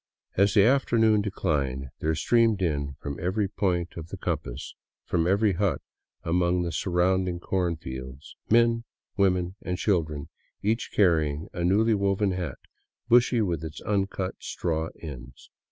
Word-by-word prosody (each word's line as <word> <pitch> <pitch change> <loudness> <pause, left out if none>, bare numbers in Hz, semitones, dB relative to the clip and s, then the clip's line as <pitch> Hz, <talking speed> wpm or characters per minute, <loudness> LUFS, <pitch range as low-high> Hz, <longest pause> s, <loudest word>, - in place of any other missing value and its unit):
As 100 +1 +3
the 100 - +7
afternoon 115 -4 +4
declined, 70 -10 -1
there 80 +1 0
streamed 115 +5 +3
in 70 -4 -1
from 70 -1 -5
every 95 +4 0
point 90 -3 -1
of 80 -1 -6
the 95 - -7
compass, 75 -7 -4 0.3
from 85 -1 +1
every 100 +2 +3
hut 100 +1 0 0.4
among 90 +1 +1
the 85 - -2
surrounding 90 0 +1
corn 90 -1 -1
fields, 65 -2 -8
men, 115 0 +4 0.3
women, 90 -1 +1
and 90 0 -3
children, 80 -8 -1 0.3
each 110 +3 0
carrying 80 -6 +2
a 85 - -3
newly 105 +6 +3
woven 100 0 +1
hat, 90 -7 -3 0.5
bushy 120 0 +5
with 85 -5 -2
its 80 -1 -6
uncut 95 -2 -1
" - - -63
straw 80 -1 -2
'* - - -24
ends. 65 -5 -10
90 Hz, 150 wpm, -27 LUFS, 80-100 Hz, 0.5 s, the